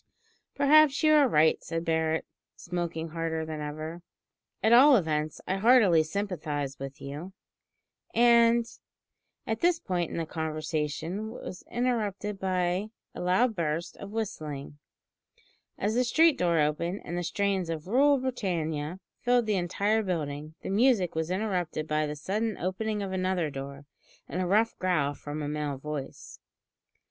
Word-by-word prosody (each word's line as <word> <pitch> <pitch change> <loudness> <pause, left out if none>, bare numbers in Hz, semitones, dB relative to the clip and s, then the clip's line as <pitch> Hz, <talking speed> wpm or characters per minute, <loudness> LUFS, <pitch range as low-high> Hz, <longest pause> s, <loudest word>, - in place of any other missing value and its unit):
"Perhaps 290 +1 +5
you 310 0 +6
are 295 -3 +6
right," 160 -7 +3
said 165 0 -4
Barret, 160 0 0 0.3
smoking 170 -2 -4
harder 160 0 -2
than 155 -1 -5
ever. 155 +3 -6 0.6
"At 220 - +5
all 270 +4 +8
events, 155 -6 0
I 190 - -1
heartily 210 -6 +5
sympathise 155 -6 -3
with 135 +2 -7
you, 145 +7 -7 0.8
and 235 0 +5 0.4
" - - -55
At 225 0 -2
this 345 -1 +2
point 180 - -2
the 165 - -1
conversation 160 +5 -3
was 185 -4 -8
interrupted 210 -5 -1
by 185 +2 0 0.2
a - - -7
loud 190 +7 +2
burst 165 -1 -2
of 200 - -8
whistling, 150 -10 -5 1.0
as 210 +2 0
the 250 +2 +2
street 315 +5 +4
door 170 -2 +1
opened 170 +6 0
and 175 - -4
the 175 - -1
strains 190 0 -1
of 160 -2 -4
"Rule 275 +8 +4
Britannia" 175 - -2 0.2
filled 245 -1 +2
the 215 - +1
entire 200 +4 +1
building. 155 -5 -4
The - - -4
music 210 -4 +3
was 160 0 -2
interrupted 180 -5 -2
by 155 0 0
the 150 - -4
sudden 210 +7 -2
opening 210 +3 -2
of 195 - -4
another 185 -4 0
door, 140 +1 -7 0.4
and 180 - -3
a 180 - -1
rough 220 +5 +2
growl 160 -6 +1
from 150 +1 -6
a - - -3
male 150 -2 -3
voice. 145 -1 -7
180 Hz, 150 wpm, -28 LUFS, 155-215 Hz, 1.0 s, all